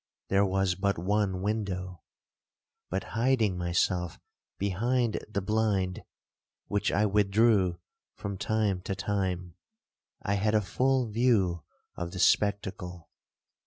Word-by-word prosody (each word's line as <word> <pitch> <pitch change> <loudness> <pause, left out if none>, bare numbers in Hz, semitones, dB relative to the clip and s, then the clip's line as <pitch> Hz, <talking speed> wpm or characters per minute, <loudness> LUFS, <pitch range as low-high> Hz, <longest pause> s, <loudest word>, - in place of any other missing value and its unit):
There 100 +1 +3
was 95 -1 +1
but 100 +2 0
one 95 +1 0
window; 95 -4 -3 0.9
but, 95 +2 -2
hiding 115 -4 +2
myself 90 0 0 0.4
behind 115 +5 0
the 100 -2 -2
blind, 100 -3 0 0.6
which 105 0 0
I 105 - +2
withdrew 100 -2 +3 0.4
from 100 -2 -5
time 105 -4 0
to 95 0 -3
time, 95 -3 -2 0.7
I 100 - 0
had 105 +2 +1
a 105 - +4
full 130 +6 +1
view 105 -7 +2 0.3
of 85 0 -5
the - - -5
spectacle. 95 -4 +1
100 Hz, 115 wpm, -29 LUFS, 90-105 Hz, 0.9 s, a